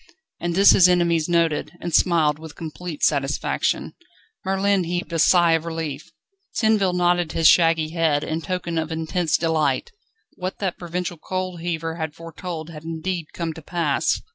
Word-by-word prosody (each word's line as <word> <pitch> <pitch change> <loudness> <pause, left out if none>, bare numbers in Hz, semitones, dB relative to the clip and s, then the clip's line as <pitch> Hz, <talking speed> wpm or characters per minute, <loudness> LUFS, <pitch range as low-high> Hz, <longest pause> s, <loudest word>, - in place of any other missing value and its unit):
And 175 0 -2
this 200 +2 +7
his 180 -1 +6
enemies 170 -2 +2
noted, 165 -3 +1
and 175 -1 -5
smiled 155 -4 +3
with 160 -2 -10
complete 165 0 -7
satisfaction. 140 -1 0 0.5
Merlin 195 -1 +1
heaved 175 0 -3
a 165 - 0
sigh 175 +1 +5
of 165 -1 +2
relief. 160 -3 -5 0.5
Tinville 215 -4 +3
nodded 175 -1 +1
his 165 -1 +4
shaggy 165 -2 +4
head, 160 -3 +1
in 160 +1 -3
token 170 -2 -3
of 160 0 -4
intense 160 +1 0
delight. 160 - 0 0.5
What 185 +1 -4
that 190 -4 -3
provincial 175 0 -4
coal 185 +1 -4
heaver 165 -1 -3
had 160 -3 -4
foretold 165 0 -7
had 155 -1 -10
indeed 165 +1 -4
come 165 -2 -4
to 160 - -10
pass. 160 -3 0
165 Hz, 160 wpm, -23 LUFS, 160-180 Hz, 0.5 s, this